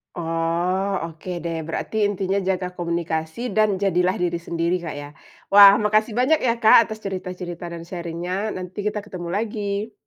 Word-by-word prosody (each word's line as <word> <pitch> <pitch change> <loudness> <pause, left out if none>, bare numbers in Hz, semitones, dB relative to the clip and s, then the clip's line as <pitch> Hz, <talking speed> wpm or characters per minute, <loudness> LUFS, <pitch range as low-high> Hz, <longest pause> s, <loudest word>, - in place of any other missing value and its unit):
Oh, 170 +3 -1 0.2
oke 160 +3 -11
deh. 165 -1 -3
Berarti 165 - -4
intinya 195 -1 -1
jaga 185 -1 -1
komunikasi 170 +5 -2
dan 210 -3 +2
jadilah 185 -1 +2
diri 175 -1 0
sendiri, 170 +1 -1
Kak, 160 - -4
ya? 145 - -9 0.4
Wah, 200 0 +10
makasih 215 +1 +2
banyak, 285 +6 +4
ya, 245 -5 +1
Kak, 225 +1 +7
atas 220 -1 -8
cerita-cerita 180 -2 -5
dan 170 - -7
sharing-nya, 180 +4 -3
nanti 185 +2 -6
kita 210 0 -1
ketemu 185 -4 -7
lagi. 210 0 -3
185 Hz, 155 wpm, -23 LUFS, 170-205 Hz, 0.4 s, Wah